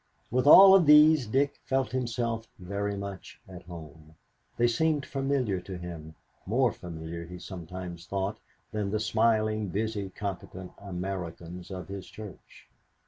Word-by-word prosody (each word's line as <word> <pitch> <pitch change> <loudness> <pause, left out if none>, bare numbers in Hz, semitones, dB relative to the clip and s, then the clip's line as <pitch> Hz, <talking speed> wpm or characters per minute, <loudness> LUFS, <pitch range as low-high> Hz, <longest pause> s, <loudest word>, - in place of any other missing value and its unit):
With 130 +3 +1
all 190 +5 +10
of 185 -5 +6
these 150 -3 +7
Dick 140 +5 +1
felt 130 -4 0
himself 120 -2 -2
very 100 +2 -3
much 100 -2 -8
at 90 -2 -10
home. 80 -2 -11 0.4
They 120 - +3
seemed 150 +4 +1
familiar 135 -8 -1
to 95 0 -7
him, 85 -3 -8 0.3
more 120 +3 +3
familiar, 85 -2 -7
he 90 +1 -8
sometimes 90 -1 -8
thought, 100 +3 -2 0.3
than 105 -2 -2
the 105 +2 -1
smiling, 110 -1 +1
busy, 105 +1 -2
competent 95 -2 -6
Americans 90 -2 -6
of 95 -2 -7
his 100 -1 -7
church. 105 -3 -12
100 Hz, 140 wpm, -28 LUFS, 90-120 Hz, 0.4 s, all